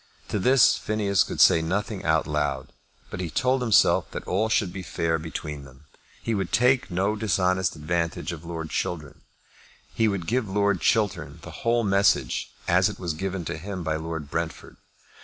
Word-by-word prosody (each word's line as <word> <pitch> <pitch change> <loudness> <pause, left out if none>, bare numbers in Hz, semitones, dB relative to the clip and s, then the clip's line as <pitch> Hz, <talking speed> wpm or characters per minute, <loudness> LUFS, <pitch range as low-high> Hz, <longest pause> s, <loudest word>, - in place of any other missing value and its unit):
To 105 - -1
this 125 0 +5
Phineas 105 -3 +1
could - - -6
say 80 - +6
nothing 95 +4 -2
out 80 -1 +2
loud, 75 -3 -2 0.4
but - - -5
he 90 -2 -3
told 130 +7 +1
himself 110 -6 +4
that - - -7
all 105 +5 +1
should 100 -5 +1
be 95 - -5
fair 80 -1 -1
between 75 -2 -6
them. 65 +2 -16 0.4
He 115 - -1
would 95 -4 -2
take 125 +1 +3
no 95 +4 0
dishonest 95 -4 +1
advantage 85 +1 -2
of 85 -2 -8
Lord 80 -2 -6
Chiltern. 75 -3 -4 0.7
He 110 - +2
would 100 -5 -2
give 115 0 -1
Lord 100 -1 +1
Chiltern 105 -3 0
the - - -9
whole 115 0 0
message 100 -1 +2 0.2
as - - +4
it - - -7
was 85 -3 -3
given 95 +1 -4
to 75 - -4
him 95 0 -5
by 80 -1 -1
Lord 80 -2 -5
Brentford. 85 -2 -4
90 Hz, 175 wpm, -25 LUFS, 80-105 Hz, 0.7 s, say